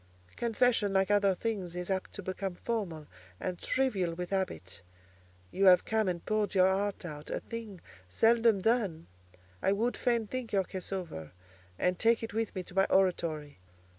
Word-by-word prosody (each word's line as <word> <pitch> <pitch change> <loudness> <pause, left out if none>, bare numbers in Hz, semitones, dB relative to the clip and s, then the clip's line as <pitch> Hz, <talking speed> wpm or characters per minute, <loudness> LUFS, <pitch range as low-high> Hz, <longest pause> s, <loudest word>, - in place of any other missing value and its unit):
Confession, 230 -3 +2
like 190 +1 +2
other 200 -2 +4
things, 190 -4 -3
is 180 +2 -3
apt 190 -1 -2
to 200 - -7
become 185 0 -3
formal 180 -9 -3 0.3
and 180 -1 -3
trivial 195 -11 0
with 180 +1 -5
habit. 180 - -3 0.7
You 195 - +1
have 180 -1 +7
come 220 -2 +1
and 175 -2 -2
poured 215 -1 0
your 190 0 +5
heart 200 -1 -2
out; 150 -3 -7
a - - -2
thing 225 -6 -8 0.3
seldom 225 - +4
done. 200 -8 +1 0.6
I 195 - +3
would 230 +4 0
fain 235 -2 +1
think 250 +1 -5
your 195 -1 +3
case 185 0 -7
over, 165 - -5 0.4
and 180 0 +1
take 230 0 +3
it 225 - -5
with 225 -1 -2
me 185 - -3
to 180 - -14
my 195 +1 +4
oratory. 160 - +1
195 Hz, 170 wpm, -31 LUFS, 180-220 Hz, 0.7 s, have